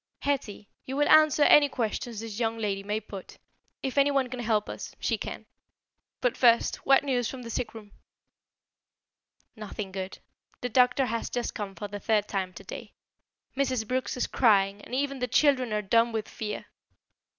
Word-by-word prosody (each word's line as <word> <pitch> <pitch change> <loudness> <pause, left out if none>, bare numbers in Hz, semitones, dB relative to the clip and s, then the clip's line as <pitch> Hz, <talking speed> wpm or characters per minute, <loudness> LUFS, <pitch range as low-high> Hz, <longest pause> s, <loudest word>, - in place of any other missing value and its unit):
"Hetty, 250 -8 -2 0.2
you 265 - -4
will 290 - +3
answer 310 -1 +6
any 290 0 +7
questions 230 -2 -3
this 225 -1 -6
young 225 -1 0
lady 200 -3 -2
may 205 +2 -2
put. 200 -3 -10 0.5
If 270 +1 0
anyone 275 -2 +2
can 255 - -5
help 220 -3 0
us, - - -7
she - - 0
can. - - -6 0.8
But 250 - +1
first, 235 -2 +4
what 270 0 +4
news 250 -4 0
from 260 -2 -7
the 230 - -7
sick 230 - -3
room?" 210 -2 -11 1.6
"Nothing 210 -2 -6
good. 190 0 -5 0.4
The 250 - -2
doctor 250 +2 +4
has 230 -1 -3
just 245 -1 -3
come 200 -2 -5
for 205 - -5
the 205 0 -7
third 210 -1 +1
time 190 -2 -2
today. - - -9 0.6
Mrs. 260 -5 0
Brooks 255 +1 -2
is 250 - +1
crying 200 -4 +3
and 250 - -6
even 275 0 -1
the 250 - -1
children 255 -2 +3
are 210 0 0
dumb 230 +4 +3
with 220 -1 -3
fear." 210 -1 -5
230 Hz, 175 wpm, -28 LUFS, 210-260 Hz, 1.6 s, any